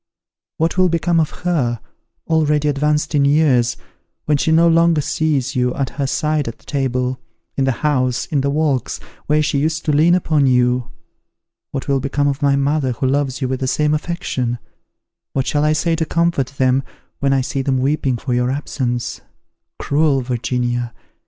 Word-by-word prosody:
What 165 +3 0
will 185 -1 +4
become 170 0 +1
of 155 - +1 0.2
her, 130 -10 0 0.5
already 150 -2 +1
advanced 150 +2 0
in 145 -2 +3
years, 140 -5 +3 0.5
when 150 - +2
she 150 +3 +1
no 165 +1 +5
longer 165 -1 +4
sees 145 -2 -1
you 125 0 +1
at 135 -2 -2
her 140 -1 -2
side 150 0 0
at 115 - -5
table, 130 -2 -2 0.4
in 135 - +1
the 135 - +2
house, 130 -4 +1
in 145 -3 0
the 140 - 0
walks, 145 -4 0 0.3
where 150 +1 +3
she 145 -2 0
used 155 +2 -1
to 150 - +2
lean 160 +4 +4
upon 155 -6 +2
you? 125 -1 +2 0.8
What 135 - -5
will 140 -1 +2
become 145 +2 0
of 140 0 -1
my 140 -1 +3
mother, 140 -1 +1
who 125 - -3
loves 135 0 0
you 130 - 0
with 130 0 -2
the 130 - -2
same 150 +3 +1
affection? 140 -7 -2 0.8
What 135 -1 0
shall 145 +1 0
I 150 0 +3
say 165 +2 +1
to 160 - 0
comfort 170 -6 +1
them 130 0 +3 0.4
when 140 -1 +1
I 135 -1 +3
see 135 +1 -2
them 135 0 0
weeping 135 -1 0
for 125 +2 -3
your 125 0 +1
absence? 130 -3 -3 0.6
Cruel 145 -2 +1
Virginia! 120 -1 -2
140 Hz, 180 wpm, -19 LUFS, 130-155 Hz, 0.8 s, no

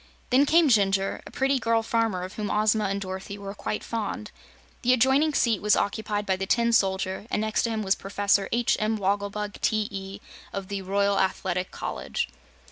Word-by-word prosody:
Then 270 +3 +5
came 330 +1 +5
Jinjur, 195 -5 +2
a - - -9
pretty 270 0 +1
girl 230 -1 +1
farmer 225 -5 0
of 185 - -7
whom 210 -2 -4
Ozma 215 0 +2
and 200 0 -1
Dorothy 190 +1 -6
were 200 -1 -7
quite 210 - -4
fond. 215 -1 -4 0.5
The 250 +1 +4
adjoining 265 +5 +3
seat 230 -5 +2
was 210 0 +4
occupied 205 0 -1
by 190 -2 +1
the 195 0 -3
Tin 235 +1 +2
Soldier, 190 -1 +1
and - - 0
next 215 0 0
to - - 0
him 220 -1 -2
was 190 -1 +3
Professor 200 0 0
H. 235 0 +2
M. 215 0 0
Wogglebug, 205 +1 -2
T.E., 200 -2 -2 0.3
of 195 -1 -5
the 200 -1 -3
Royal 200 +1 +1
Athletic 185 -1 -1
College. - - -4
205 Hz, 185 wpm, -26 LUFS, 195-225 Hz, 0.5 s, Then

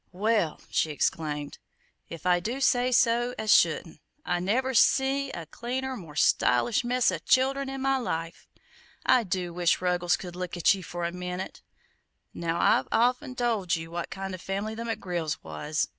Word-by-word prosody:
"Well," 205 -4 +1
she 160 - +1
exclaimed, 150 -1 -2 0.5
"if 165 -1 -9
I 180 -1 +4
do 235 +9 -3
say 255 -1 +2
so 240 0 +2
as 215 - +3
shouldn't, - - +1 0.2
I 175 - 0
never 250 +9 0
see 270 +3 +3
a 170 -9 -6
cleaner, 255 - -4
more 165 -9 -10
stylish 135 - +3
mess 245 -2 +2
o' 175 - -3
childern 270 +7 +2
in 270 0 -5
my 270 0 +2
life! 165 -9 -4 0.6
I 250 - +5
do 180 -3 -3
wish 175 0 +2
Ruggles 180 -1 +1
could 175 -2 -8
look 180 -1 -5
at 175 - +5
ye 195 - -6
for 175 0 -5
a 170 - -1
minute! 180 +1 -6 0.7
Now, 170 0 -2
I've 130 - +3
of 245 +3 +2
'en 260 -4 -8
told 220 -8 0
ye 165 0 -5
what 170 +1 -5
kind 195 0 -5
of 185 - -7
a - - -15
family 200 +3 -3
the 230 +1 -5
McGrills 175 -8 -3
was. 150 +1 -2
190 Hz, 180 wpm, -27 LUFS, 170-245 Hz, 0.7 s, I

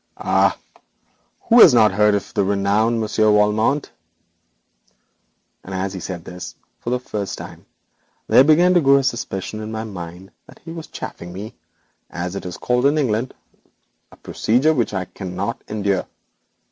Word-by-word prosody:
'Ah! - - +2 0.8
who 240 +1 +4
has 155 - +9
not 110 -3 +5
heard 105 +1 +3
of 100 - -4
the 100 - +1
renowned 100 +4 +1
Monsieur 110 0 +2
Valmont,' 105 +7 +2 1.7
and 95 - -7
as 95 +1 -2
he 95 - -6
said 85 -1 -7
this, 90 0 -8 0.2
for - - -5
the 125 +1 0
first 105 -5 -5
time, - - -11 0.6
there 130 - +6
began 170 +5 +5
to 175 - +4
grow 140 -1 +5
a 140 - +3
suspicion 110 -5 -3
in 110 0 -6
my 110 0 -4
mind 90 -3 -9 0.2
that - - -16
he 165 - -7
was 165 -1 -8
chaffing 85 - -8
me, 100 +4 -8 0.6
as 90 +2 -5
it 100 - -5
is 90 - -7
called 125 +2 +1
in 145 +2 +1
England 125 -3 -1 0.8
a - - -15
procedure 130 +8 +1
which 120 -6 0
I 95 -2 -3
cannot 95 +1 -5
endure. 100 -3 -1
105 Hz, 160 wpm, -20 LUFS, 95-125 Hz, 1.7 s, has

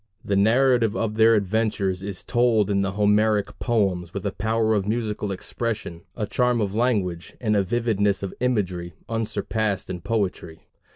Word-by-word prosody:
The 100 - 0
narrative 115 +2 +3
of 110 -2 -1
their 110 +1 +5
adventures 100 -2 0
is 100 -1 -5
told 115 -4 +2
in 100 -1 +2
the 100 0 -1
Homeric 105 0 +2
poems 95 -7 0
with 100 - -4
a 100 - 0
power 110 +2 0
of 100 -2 0
musical 105 -2 -2
expression, 100 -3 -4 0.2
a 110 - -1
charm 125 +2 +1
of 100 -3 -1
language, 105 -8 -1
and 105 -3 +1
a 100 - +4
vividness 105 -1 0
of 95 - -4
imagery 90 -9 -1
unsurpassed 110 -3 -2
in 90 -1 -5
poetry. 95 -5 -3
105 Hz, 160 wpm, -24 LUFS, 95-115 Hz, 0.2 s, their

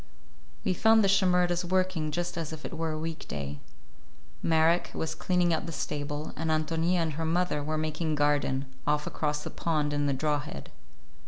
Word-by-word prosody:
We 185 - +3
found 220 +4 +5
the - - +4
Shimerdas 180 -2 +3
working 185 -3 0
just 175 +3 -2
as 165 -3 -3
if 155 -1 -7
it - - -6
were 165 0 -1
a 155 - -2
week 160 +1 -5
day. 70 0 -5 0.8
Marek 165 +1 +3
was 160 0 -2
cleaning 175 +1 +1
out 160 - -1
the - - -4
stable, 145 -1 -3
and 160 0 -2
Ántonia 160 +3 +1
and 165 -2 0
her 160 +3 -3
mother 165 -2 +1
were 155 +1 -1
making 155 0 -1
garden, 145 -2 +1 0.2
off 150 0 +2
across 150 -1 -2
the - - -5
pond 150 -3 0
in 145 0 +1
the 140 - +2
draw 150 +2 +1
head. 105 - -8
160 Hz, 185 wpm, -29 LUFS, 150-175 Hz, 0.8 s, found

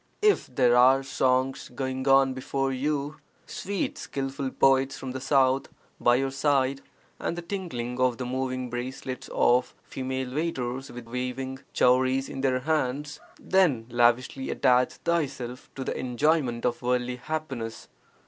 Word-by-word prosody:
If 420 -1 +4
there 125 -2 +3
are 130 +2 +6
songs 130 0 0
(going 130 +1 -3
on) 135 -1 +5
before 135 +1 -2
you, 145 +2 -2 0.3
sweet 200 0 -3
(skilful) 135 0 -3
poets 135 0 +3
from 130 - -6
the 130 0 -5
South 135 -1 +3 0.3
by 120 - +4
your 135 +1 0
side 135 -1 +1 0.4
and 170 - -2
the 175 - -5
tinkling 130 -11 -4
of 130 -2 +2
the 125 - -4
moving 130 0 -3
bracelets 130 +1 -5
of 125 +1 +2
female 130 -1 -4
waiters 135 -4 -2
with 120 -1 -9
waving 125 +2 -4
chowries 130 +1 +3
in 135 - -5
their 130 -1 +1
hands, 145 0 -1 0.2
then 160 -12 +2
lavishly 120 +2 +2
attach 125 0 +3
thyself 135 -7 -3
to 135 - -4
the - - -3
enjoyment 130 -1 0
of 120 -1 0
worldly 125 0 0
happiness. 130 -5 -5
130 Hz, 140 wpm, -27 LUFS, 125-135 Hz, 0.4 s, are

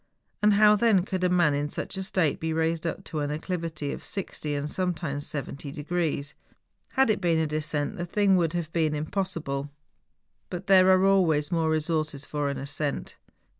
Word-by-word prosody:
And 210 0 +5
how 210 +1 +6
then 205 -4 +3
could 185 -2 -3
a 180 - +3
man 175 -5 +3
in 145 +1 -1
such - - -5
a 190 - -3
state 185 -5 0
be 160 0 -2
raised 160 +1 0
up 180 +3 -5
an 145 -2 -1
acclivity 155 -2 -3
of - - -8
60 155 -6 -3
and 145 +1 -2
sometimes 160 -4 -2
70 140 0 -5
degrees. 150 -1 -2 0.6
Had 265 -4 +4
it 205 - -1
been 170 -2 +2
a 160 - +2
descent 150 +4 -2
the 175 - -3
thing 200 +1 +3
would 170 -2 +1
have 170 -2 -3
been 155 -3 +1
impossible; 155 -4 -3 0.8
but 180 +1 -5
there 190 -1 +6
are 185 0 +5
always 165 -7 +3
more 165 -2 +1
resources 155 -2 -1
for 145 -1 -2
an 140 - -3
ascent. 145 +1 -4
160 Hz, 180 wpm, -27 LUFS, 150-185 Hz, 0.8 s, how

